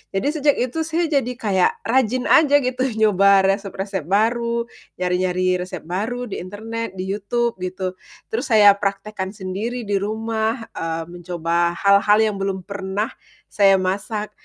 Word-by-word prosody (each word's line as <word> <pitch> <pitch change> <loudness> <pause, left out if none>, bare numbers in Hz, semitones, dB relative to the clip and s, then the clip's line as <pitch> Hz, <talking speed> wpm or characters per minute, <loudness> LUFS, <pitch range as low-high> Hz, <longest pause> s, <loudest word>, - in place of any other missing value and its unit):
Jadi 195 +8 0
sejak 290 0 +3
itu 250 +6 -2
saya 330 0 -1
jadi 270 -4 +1
kayak 195 -5 +2
rajin 255 0 +1
aja 290 -2 +5
gitu 255 +1 0
nyoba 200 -2 +4
resep-resep 195 -3 -4
baru, 235 +4 +1 0.3
nyari-nyari 180 0 0
resep 180 -1 -6
baru 215 +9 -3
di - - -4
internet, 220 +3 -6
di 185 - -4
YouTube 230 +2 -1
gitu. 185 0 -4 0.3
Terus 245 +5 -2
saya 215 -4 +7
praktekkan 200 0 -3
sendiri 210 +6 -4
di 200 -2 0
rumah, 220 +2 -1 0.2
eee, 165 0 -3
mencoba 170 -1 -1
hal-hal 200 +1 +5 0.2
yang 200 - -7
belum 195 -1 -2
pernah 200 +2 -3 0.4
saya 195 -2 +5
masak. 205 +3 -2
200 Hz, 140 wpm, -21 LUFS, 185-230 Hz, 0.4 s, saya